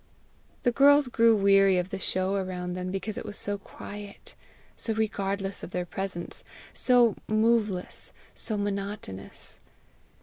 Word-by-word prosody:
The 245 - +3
girls 285 +1 +6
grew 230 -1 +5
weary 195 -2 +5
of 180 +1 -1
the 195 - -3
show 185 +1 0
around 185 -2 -2
them 180 0 -4
because 195 +3 -3
it - - -6
was 210 -1 -6
so 205 0 -2
quiet, 205 0 -10 0.4
so 225 - -2
regardless 200 -2 -1
of - - -7
their 180 -1 -2
presence, 185 -1 -5 0.3
so 245 -3 +4
moveless, 215 -4 +1 0.2
so 215 - -1
monotonous. 200 - -5
200 Hz, 135 wpm, -28 LUFS, 190-220 Hz, 0.4 s, girls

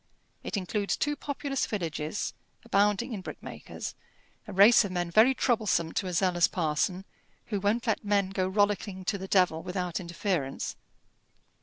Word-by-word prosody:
It - - -3
includes 200 +2 -1
two 295 0 0
populous 280 -1 -2
villages, 165 -3 -3 0.3
abounding 210 +2 +2
in 200 - -4
brickmakers, - - -7 0.5
a - - -6
race 205 +5 +7
of 200 - -4
men 175 -1 -2
very 230 +8 +6
troublesome 215 -11 +1
to 190 - -2
a 180 - -4
zealous 175 -1 +3
parson 180 +3 -1 0.5
who 205 - +1
won't 210 +5 0
let 225 -2 0
men 200 -2 +1
go 185 -1 0
rollicking 200 -1 0
to 200 +1 -1
the 190 - -6
devil 180 -5 +3
without 180 -1 -3
interference. 170 -5 -2
195 Hz, 150 wpm, -29 LUFS, 180-210 Hz, 0.5 s, race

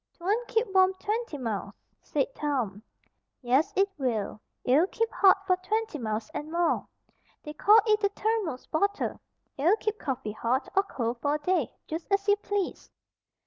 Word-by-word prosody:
"'Twon't 415 +7 -1
keep 455 +1 +1
warm 375 0 +5
twenty 425 -4 -3
miles," 215 -5 -4 0.3
said - - 0
Tom. 250 - -2 0.6
"Yes 260 +5 +2
'twill. 260 - -1 0.2
It'll 290 +8 +4
keep 455 +2 -1
HOT 390 0 +4
for 365 -1 +3
twenty 430 -2 -2
miles 215 -2 -2
and 305 +2 -5
more. 340 0 +1 0.6
They 300 - -7
call 415 +8 +6
it 430 -1 +2
a 405 - +4
thermos 410 - -2
bottle. 400 +6 -1 0.4
It'll 330 +9 +4
keep 430 -1 -2
coffee 260 -6 -3
hot, 235 +5 -1
or 390 - +6
cold, 240 - -3
for 290 0 +1
a - - -2
day, 335 -3 0
just 320 +1 -5
as 395 +1 +1
you 405 - +6
please." 405 -2 -3
345 Hz, 160 wpm, -28 LUFS, 260-405 Hz, 0.6 s, call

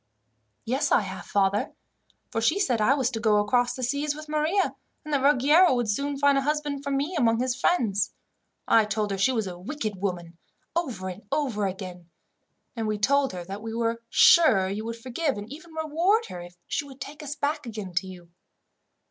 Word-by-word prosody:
"Yes, 270 +5 0
I - - +5
have, 190 -2 -7
father; 200 0 +1 0.6
for 225 -2 -1
she 315 - +2
said 250 - +1
I 255 +6 +4
was 260 -3 0
to 225 - -3
go 215 -2 +3
across 245 +4 +2
the 255 - -5
seas 285 +4 -1
with 305 0 -9
Maria, 310 +6 +1 0.3
and 305 - -4
that 280 - +2
Ruggiero 290 +4 +5
would 240 -2 0
soon 280 +7 -1
find 280 0 +4
a - - -1
husband 295 -1 -2
for 280 - -3
me 280 +6 -1
among 230 -6 +2
his 250 0 0
friends. 220 - +1 0.6
I 225 -1 +5
told 210 0 -1
her 195 - -1
she 230 +7 +3
was 225 -4 -1
a 180 -2 -7
wicked 215 -1 -4
woman, 175 -3 -4 0.4
over 255 - -2
and 185 +2 -6
over 230 -9 0
again, 180 -2 -7 0.7
and 225 -2 -2
we 215 0 -1
told 275 +5 +2
her 180 -1 -5
that 195 +3 -7
we 225 0 -5
were 230 0 -1
sure 220 - +6
you 205 +3 -4
would 230 0 -4
forgive, 260 +4 -2
and 205 +1 -6
even 330 +3 -12
reward 335 +8 +1
her, 175 - -7
if 175 0 -11
she - - -2
would 275 -2 -13
take 285 +4 -8
us 290 -1 -5
back 290 -2 -2
again 210 -5 -6
to 190 - +1
you. 175 -2 -12
245 Hz, 205 wpm, -26 LUFS, 205-290 Hz, 0.7 s, sure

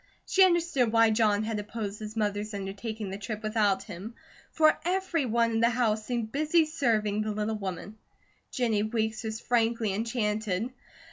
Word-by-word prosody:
She 385 - +5
understood 340 -10 +3
why 225 -1 +5
John 215 -1 +2
had 220 -1 -2
opposed 210 -1 -5
his 215 +1 -7
mother's 210 0 -1
undertaking 200 +1 -5
the 195 - -5
trip 215 0 -5
without 210 -3 +1
him, 205 +3 -8 0.4
for 310 -1 +4
everyone 315 - +1
in 225 - 0
the 230 +1 +4
house 225 -3 +1
seemed 235 -3 -2
busy 310 +3 +3
serving 225 -9 0
the 215 - -2
little 215 +1 -2
woman. 195 +2 -6 0.5
Jennie 230 -5 0
Weeks 220 +1 -1
was 220 0 -4
frankly 230 -3 +1
enchanted. 220 0 -1
220 Hz, 155 wpm, -28 LUFS, 210-240 Hz, 0.5 s, She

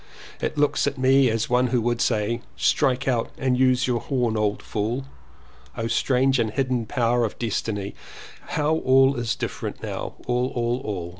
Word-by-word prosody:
It - - -2
looks 145 0 +2
at 140 -1 -2
me 130 0 +4
as 110 0 0
one 125 +1 +2
who 125 0 +1
would 120 0 0
say, 115 +1 0 0.2
'Strike 130 -4 +1
out 120 -3 +1
and 130 -1 +1
use 130 0 +3
your 125 -2 0
horn 125 -5 -1
old 105 -1 -1
fool.' 115 +6 -2 0.7
O 115 - -2
strange 130 +2 +2
and 115 -2 +1
hidden 125 -1 -1
power 120 -1 +1
of 110 - -3
Destiny, 105 -3 -2 0.5
how 155 +1 +1
all 135 -1 +4
is 115 -1 -1
different - - -5
now, - - -5
all, 125 +1 +1
all, 120 +1 0
all. 90 -5 -4
125 Hz, 170 wpm, -24 LUFS, 115-130 Hz, 0.7 s, me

